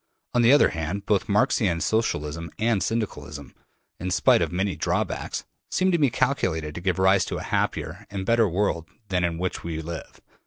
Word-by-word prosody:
On 120 - +3
the 120 +2 +6
other 145 - +6
hand, 85 +5 -4
both 105 +1 +1
Marxian 100 -3 +2
Socialism 85 -6 -1
and 110 -2 +1
Syndicalism, 75 - -3 0.5
in 90 - -3
spite 90 - +4
of 85 -1 0
many 95 +2 -1
drawbacks, - - -2 0.3
seem 185 0 +2
to 170 - +2
me 145 -3 +4
calculated 80 - 0
to 85 - -6
give 95 0 0
rise 95 0 +4
to - - -4
a - - -5
happier 90 +6 -2
and 100 -1 -4
better 115 -1 +3
world 85 -3 0 0.2
than 90 -2 +1
that 90 - +3
in - - -6
which 90 +1 -3
we 80 -2 -4
live. 80 +1 -7
95 Hz, 190 wpm, -25 LUFS, 85-110 Hz, 0.5 s, the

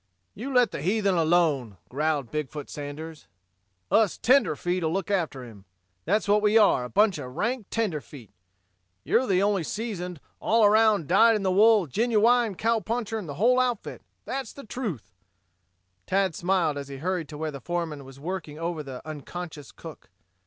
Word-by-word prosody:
"You 255 +7 -6
let 245 -5 +4
the - - -5
heathen 200 +3 +1
alone," 160 - +1
growled 145 -2 -1
Big 150 -3 -2
foot 150 -2 -8
Sanders. 150 +2 -8 0.6
"Us 215 -4 +3
tenderfeet'll 180 - +2
look 195 +3 -2
after 160 -9 -1
him. 105 -5 -13 0.4
That's 205 +5 +1
what 205 +1 +4
we 210 +1 +4
are, 205 - +4
a 125 - -6
bunch 205 - +3
of 125 0 -8
rank 235 -1 -2
tenderfeet. 150 - -4 0.7
You're 255 - +2
the 190 -1 +2
only 200 -2 +2
seasoned, 180 -4 -5 0.2
all 225 -1 +3
around, 210 -5 +4
dyed 225 +6 +5
in 210 - -2
the 190 - +1
wool, 210 0 +5
genuwine 230 - +2
cowpuncher 225 +1 -1
in 190 - -8
the 145 - -6
whole 245 - +3
outfit. 245 -4 -2 0.2
That's 265 -4 -4
the 280 - -11
truth." 205 - -5 1.0
Tad 190 -2 +1
smiled 175 -4 0
as 140 - -7
he 140 -1 -8
hurried 175 +1 -2
to 150 - -8
where 155 0 -3
the 140 -2 -9
foreman 165 -2 -3
was 135 0 -13
working 160 -2 -5
over 165 -1 -3
the 135 0 -9
unconscious 155 -1 -7
cook. - - -12
180 Hz, 165 wpm, -26 LUFS, 150-220 Hz, 1.0 s, dyed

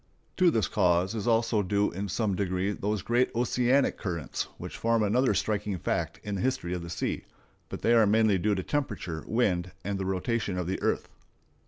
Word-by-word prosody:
To 180 -2 +5
this 110 - +1
cause 90 0 +2
is 110 0 -3
also 115 -2 +3
due 100 +1 +1
in 95 +3 -4
some 105 0 0
degree 95 0 0
those 105 -1 -2
great 120 +2 +2
oceanic 125 +3 +2
currents 85 -6 -3
which - - -7
form 115 -1 +1
another 125 +6 +2
striking 105 -2 -1
fact - - -2
in 105 - -4
the 95 - -2
history 130 -9 -1
of 90 - -3
the 85 - -7
sea; 85 - -3 0.4
but - - -7
they 115 - +4
are 115 -3 +5
mainly 105 -2 +3
due 105 +3 +1
to 95 - -2
temperature, 100 - -3
wind, 90 -6 0
and 100 -1 -2
the 95 - -2
rotation 95 +1 -1
of 90 - -1
the 95 +2 -3
earth. - - 0
105 Hz, 195 wpm, -28 LUFS, 95-115 Hz, 0.4 s, To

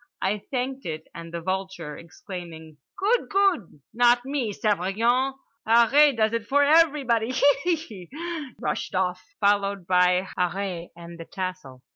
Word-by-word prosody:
I 205 +2 0
thanked 260 -1 -3
it; 155 -1 -5
and 165 0 -9
the 170 0 -5
vulture, 190 -4 -4
exclaiming: 165 -2 -10 0.2
"Good. 425 +5 +1
Good. 385 - +1
Not 240 +1 +4
me. 270 -5 -2
Surveillant. 225 +7 +1 0.3
Harree 240 +5 +5
does 220 0 +2
it 230 -2 -2
for 285 +1 +3
everybody. 285 -7 +3
Hee, 285 +6 +3
hee"—rushed 290 - -6
off, 185 -1 0 0.2
followed 200 -2 +1
by 180 +1 +3
Harree 180 -1 -2
and 170 0 -11
the 165 - -7
tassel. 185 -10 -6
205 Hz, 130 wpm, -25 LUFS, 180-270 Hz, 0.3 s, Harree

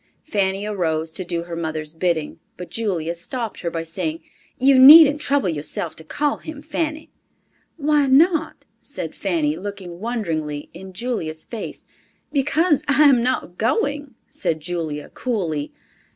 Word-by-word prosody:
Fanny 200 -5 0
arose 165 -6 -1
to 185 - -4
do 170 -1 -3
her 170 0 -7
mother's 160 -2 -4
bidding, 165 -2 -1 0.2
but 180 - -9
Julia 180 -8 -1
stopped 225 +7 -5
her 170 - -2
by 165 -1 -4
saying, 165 -1 -4 0.3
"You 265 0 +5
needn't 295 +2 +9
trouble 285 -8 +1
yourself 155 +1 -3
to 160 - -9
call 290 - -1
him, 310 -2 -9
Fanny." 310 0 -3 0.7
"Why 295 -2 +2
not?" 320 +4 +3 0.2
said - - -6
Fanny, 305 -2 0
looking 190 -3 -7
wonderingly 165 -10 -3
in 190 0 -10
Julia's 185 -7 -4
face. 230 -3 -7 0.5
"Because 295 +2 +2
I 285 +1 +4
am 260 -4 +5
not 235 -8 -2
going," 290 - -1
said 265 - -2
Julia 155 -3 -4
coolly. 170 - -3
200 Hz, 140 wpm, -21 LUFS, -, 0.7 s, needn't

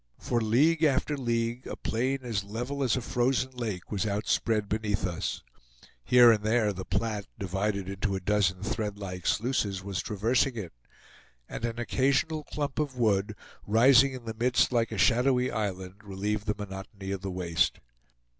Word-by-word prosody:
For 120 -1 -1
league 150 +9 +3
after 150 0 +2
league 120 -1 -2
a - - -5
plain 130 +4 -1
as 110 -5 -2
level 120 +7 -4
as 130 -2 +2
a - - -2
frozen 130 +2 0
lake 110 -8 -5
was 105 -2 0
outspread 105 +1 0
beneath 105 -2 -1
us; 90 -2 -3 0.6
here 120 - +7
and 105 -2 +1
there 110 -1 +2
the 95 0 -6
Platte, 105 +1 -2
divided 95 +1 -2
into 100 +1 -2
a - - -2
dozen 95 -1 +1
threadlike 100 -4 -4
sluices, 105 -5 0
was 95 -3 -3
traversing 115 +5 +1
it, 100 -7 -6 0.7
and 115 - -4
an 115 -1 -3
occasional 135 +6 +1
clump 145 -1 -3
of 145 -4 -2
wood, 105 -4 +1 0.3
rising 130 +5 +6
in 125 -2 -8
the 110 - -4
midst 120 +4 +2
like 115 -2 +1
a 110 - -4
shadowy 125 +4 +3
island, 95 -1 -4
relieved 105 +2 -3
the 105 - 0
monotony 95 -1 -7
of 100 -1 -3
the 95 - -4
waste. 90 -3 0
110 Hz, 165 wpm, -28 LUFS, 100-125 Hz, 0.7 s, here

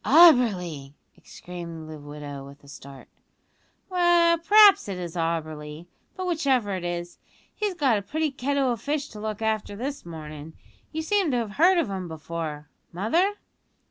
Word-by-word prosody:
"Auberly!" 205 - +5 0.2
exclaimed 170 -3 -9
the 155 -1 -9
widow, 145 -1 -8
with 140 +1 -14
a - - -17
start. 140 -2 -12 0.8
"Well, 345 -2 +4
p'raps 410 - +6
it 190 - -4
is 175 -1 -6
Auberly; 155 -2 -3 0.3
but 370 - -3
whichever 270 - +1
it 185 - -5
is, 175 0 -5 0.3
he's 415 -3 -2
got 265 -10 +2
a - - -7
pretty 310 +8 -2
kettle 270 0 0
o' - - 0
fish 290 +4 -3
to 215 - -10
look 215 0 -4
after 215 -2 -1
this 275 +6 -5
mornin'. 155 -2 -9 0.4
You 320 0 -3
seem 395 0 +1
to 250 - +1
have 225 -3 -2
heard 355 - +4
of 335 - +1
him 190 -2 -4
before, 160 -2 -6 0.2
mother?" 330 - +1
205 Hz, 160 wpm, -25 LUFS, -, 0.8 s, p'raps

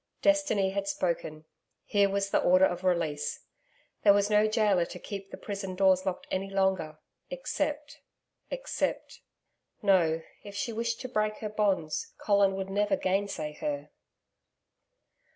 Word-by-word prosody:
Destiny 290 -11 +3
had 200 0 -2
spoken. 165 -5 -2 0.4
Here 200 -1 +3
was 200 0 -1
the - - +3
order 185 +1 +5
of 175 0 -2
release. 170 -5 -1 0.6
There 200 - +7
was 205 +1 +2
no 210 +1 +5
gaoler 210 -5 +2
to - - -9
keep 195 -1 -7
the - - -8
prison 195 -2 -5
doors 190 0 +3
locked 185 - -2
any 195 +1 -1
longer 190 -5 0 0.3
except 300 -12 -3 0.5
except - - -3 0.6
No, 165 -5 +3 0.2
if 205 -1 -10
she 225 +3 -2
wished 230 +1 -2
to 255 - -4
break 215 -3 0
her 215 - -4
bonds, 195 -7 -1
Colin 200 -2 +3
would 195 0 -4
never 205 +7 +2
gainsay 190 - -1
her. 145 0 -3
195 Hz, 140 wpm, -29 LUFS, 185-210 Hz, 0.6 s, There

